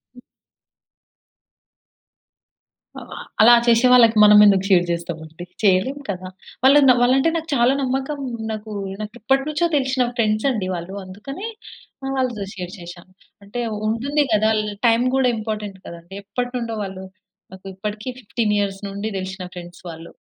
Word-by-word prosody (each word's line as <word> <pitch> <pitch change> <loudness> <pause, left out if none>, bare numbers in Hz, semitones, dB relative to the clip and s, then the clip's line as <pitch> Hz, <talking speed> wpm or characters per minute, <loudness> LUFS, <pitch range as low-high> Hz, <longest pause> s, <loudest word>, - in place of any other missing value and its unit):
హ్మ్. 245 - -13 2.8
ఆహ్, - - -12
ఆ! - - -7 0.2
అలా 235 +2 +8
చేసే 235 +2 +5
వాళ్ళకి 230 -3 +6
మనం 210 0 +8
ఎందుకు 195 -2 +4
షేర్ 180 -3 +5
చేస్తాం 170 -1 -3
అండి? 160 +3 -10 0.2
చేయలేం 200 +8 +2
కదా! 185 -1 -4 0.4
వాళ్ళు 275 +3 +7
న - - +8
వాళ్ళంటే 250 +2 +4
అంటే 330 - +3
నాకు 325 0 -6
చాలా 240 +1 +3
నమ్మకం. 270 +2 -2 0.3
నాకు 215 0 -6 0.3
నాకెప్పటి 240 +5 -1
నుంచో 305 +3 +1
తెలిసిన 260 -2 +1
ఫ్రెండ్స్ 215 0 +1
అండి 210 -7 -2
వాళ్ళు. 170 +2 -7
అందుకనే 245 - -8 0.6
ఆహ్, 270 0 -3
వాళ్ళతో 245 -6 -1
షేర్ 180 -1 -7
చేశా. 175 0 -10 0.4
అంటే 240 +5 -5 0.3
ఉంటుంది 280 +7 0
కదా! 215 +1 +3
ల్ 210 - -4 0.2
టైం 230 +1 +3
కూడా 265 -2 +3
ఇంపార్టెంట్ 210 -3 -5
కదా 170 - -8
అండి! 185 +3 -12
ఎప్పటి 245 +4 -3
నుండో 230 -2 -4
వాళ్ళు 190 -1 -7 0.5
నాకు 190 +1 -14
ఇప్పటికి 210 +4 -5
15 215 -1 -1
ఇయర్స్ 195 -1 -2
నుండి 200 +2 -5
దెలిసిన 190 0 -5
ఫ్రెండ్స్ 175 0 -10
వాళ్ళు. 165 0 -10
215 Hz, 155 wpm, -21 LUFS, 190-250 Hz, 2.8 s, అలా